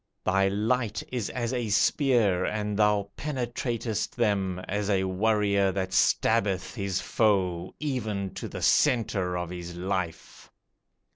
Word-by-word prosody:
Thy 95 +1 +2
light 110 +2 0
is 120 -5 -2
as 120 0 -3
a 120 -3 -2
spear, 105 - +3
And 105 0 -2
thou 105 -1 +2
penetratest 120 -5 -3
them 100 -6 0
As 105 +1 -2
a 95 -2 +2
warrior 100 0 +2
that 95 -1 -2
stabbeth 105 -5 +2
his 100 -4 -2
foe 95 -5 0
Even 110 -10 -2
to - - -5
the - - -6
center 105 -10 +2
of 90 -1 -4
his 85 -1 -7
life. 90 -2 -4
105 Hz, 130 wpm, -27 LUFS, 95-115 Hz, -, spear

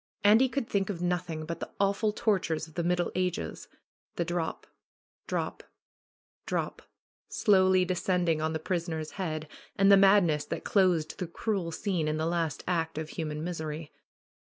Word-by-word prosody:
Andy 220 +6 +6
could 265 -3 -2
think 195 -1 0
of 190 -4 -3
nothing 175 -3 -2
but 170 +1 -5
the - - -5
awful 200 +2 +2
tortures 185 -7 0
of 160 - -17
the 170 - -2
Middle 175 0 +1
Ages. 180 -1 -2 0.5
The 170 - -1
drop, 170 -1 -3 0.6
drop, - - -2 0.9
drop - - -2 0.5
slowly 185 -2 +4
descending 180 -3 +1
on 160 0 0
the - - 0
prisoner's 160 -2 -3
head 155 -5 -4 0.3
and 195 +1 +5
the 200 - +9
mad 195 +1 +6
ness 150 -3 +1
that - - -4
closed 180 -6 +2
the 180 - -2
cruel 185 -1 -2
scene 170 -2 -1
in 155 0 0
the 160 - -1
last 165 -4 -1
act 165 -3 -1
of 155 0 -4
human 155 -1 -4
misery. 160 -3 -4
175 Hz, 160 wpm, -29 LUFS, 160-190 Hz, 0.9 s, the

